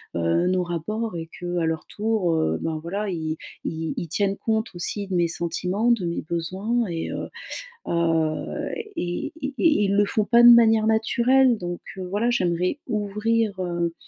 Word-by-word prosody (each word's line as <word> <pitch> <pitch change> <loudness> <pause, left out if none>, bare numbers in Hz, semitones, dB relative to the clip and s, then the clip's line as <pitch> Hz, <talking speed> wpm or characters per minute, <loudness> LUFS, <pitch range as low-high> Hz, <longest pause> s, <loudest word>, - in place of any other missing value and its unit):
heu, 85 - +1
nos 185 0 +1
rapports 180 +6 -3
et 165 -1 -5
qu'à 175 +1 -3
leur 160 -1 -2
tour, 210 -5 0
heu, 80 - +1
ben, 160 -1 -3
voilà, 200 +6 -3
ils 160 -3 -3 0.3
ils 160 0 -3
ils 170 - -3
tiennent 195 +4 0
compte 220 0 -1
aussi 190 +3 -3
de 190 - -5
mes 175 -1 +3
sentiments, 180 +7 0
de 225 -7 +1
mes 170 - -2
besoins 190 +8 -1
et 165 -1 -3
heu - - -4 0.6
heu 165 -2 0 0.3
et 175 - -3
et 275 0 -3
et 305 -10 +3
ils 200 0 +1
le 205 - +5
font 210 +1 0
pas 235 +2 +5
de 240 - +11
manière 225 -2 +6
naturelle. 240 +3 +3
Donc 175 -2 -5 0.2
voilà, 195 +5 -1
j'aimerais 180 - 0
ouvrir, 215 0 0
heu, 170 -1 -1
185 Hz, 170 wpm, -24 LUFS, 170-220 Hz, 0.6 s, de